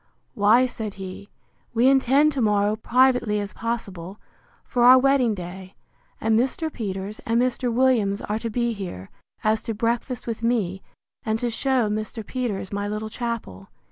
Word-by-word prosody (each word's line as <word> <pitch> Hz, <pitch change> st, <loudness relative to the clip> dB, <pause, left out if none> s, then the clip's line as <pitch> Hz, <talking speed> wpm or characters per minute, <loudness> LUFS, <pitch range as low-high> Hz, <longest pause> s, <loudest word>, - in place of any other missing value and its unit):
Why, 215 Hz, +5 st, +4 dB
said 220 Hz, -5 st, -5 dB
he, 195 Hz, +1 st, -8 dB, 0.5 s
we 235 Hz, +3 st, +4 dB
intend 270 Hz, +3 st, +4 dB
to 275 Hz, -3 st, -2 dB
morrow, 210 Hz, -1 st, +2 dB
privately 245 Hz, -2 st, +2 dB
as 205 Hz, 0 st, -5 dB
possible, 200 Hz, -5 st, -5 dB, 0.5 s
for 245 Hz, -, 0 dB
our 250 Hz, +1 st, +9 dB
wedding 260 Hz, -4 st, +3 dB
day; 185 Hz, +1 st, -9 dB, 0.4 s
and 220 Hz, 0 st, +2 dB
Mr. 295 Hz, +6 st, -1 dB
Peters 200 Hz, -1 st, -5 dB
and 230 Hz, +1 st, 0 dB
Mr. 250 Hz, 0 st, 0 dB
Williams 230 Hz, -5 st, +2 dB
are 210 Hz, +1 st, -2 dB
to 230 Hz, -, -4 dB
be 235 Hz, +1 st, 0 dB
here, 175 Hz, -, -7 dB, 0.3 s
as 215 Hz, 0 st, +2 dB
to 225 Hz, -2 st, -4 dB
breakfast 235 Hz, +2 st, -2 dB
with 230 Hz, -1 st, -4 dB
me, 210 Hz, -6 st, 0 dB, 0.4 s
and 220 Hz, 0 st, -1 dB
to 240 Hz, +1 st, -2 dB
shew 255 Hz, -1 st, +1 dB
Mr. 215 Hz, +1 st, -4 dB
Peters 230 Hz, -7 st, -3 dB
my 205 Hz, 0 st, -2 dB
little 215 Hz, +1 st, -4 dB
chapel. 230 Hz, -, -5 dB
225 Hz, 160 wpm, -24 LUFS, 205-245 Hz, 0.5 s, our